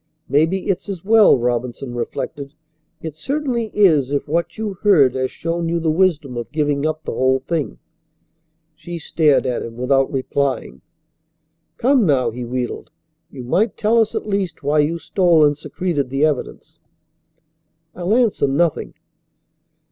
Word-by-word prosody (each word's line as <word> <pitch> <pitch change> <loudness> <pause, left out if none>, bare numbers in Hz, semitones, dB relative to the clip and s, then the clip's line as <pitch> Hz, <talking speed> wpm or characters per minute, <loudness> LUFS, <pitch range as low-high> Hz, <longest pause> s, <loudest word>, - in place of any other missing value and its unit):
"Maybe 160 +7 +1
it's 195 +1 -2
as 190 -2 -6
well," 220 -6 +6
Robinson 120 +1 -2
reflected. 140 +4 -5 0.5
"It 160 -2 -5
certainly 250 - -2
is 160 -10 +3
if 140 0 -2
what 170 +2 -2
you 215 -2 -3
heard 155 - +5
has 130 0 -1
shown 165 0 -3
you 170 0 0
the 160 -1 0
wisdom 155 -7 +1
of 120 +2 -6
giving 145 -1 0
up 155 0 -3
the - - -4
whole 130 +2 +1
thing." 160 +1 -3 1.0
She 175 +2 -8
stared 155 -3 +2
at 125 -2 -1
him 115 0 -8
without 135 +3 +1
replying. 135 - -2 1.0
"Come 260 0 +3
now," 130 -5 +2
he 125 +2 -6
wheedled. 125 +3 -4 0.4
"You 130 -5 -9
might 200 - 0
tell 225 +2 +2
us 225 -1 +1
at - - -3
least 195 -6 -2
why 145 +2 +2
you 155 +3 +1
stole 170 -3 +3
and 145 0 +2
secreted 155 -2 -3
the 135 +3 +1
evidence." 150 -4 -4 1.1
"I'll 180 +5 0
answer 230 - +2
nothing." 155 +4 0
155 Hz, 150 wpm, -20 LUFS, 135-185 Hz, 1.1 s, well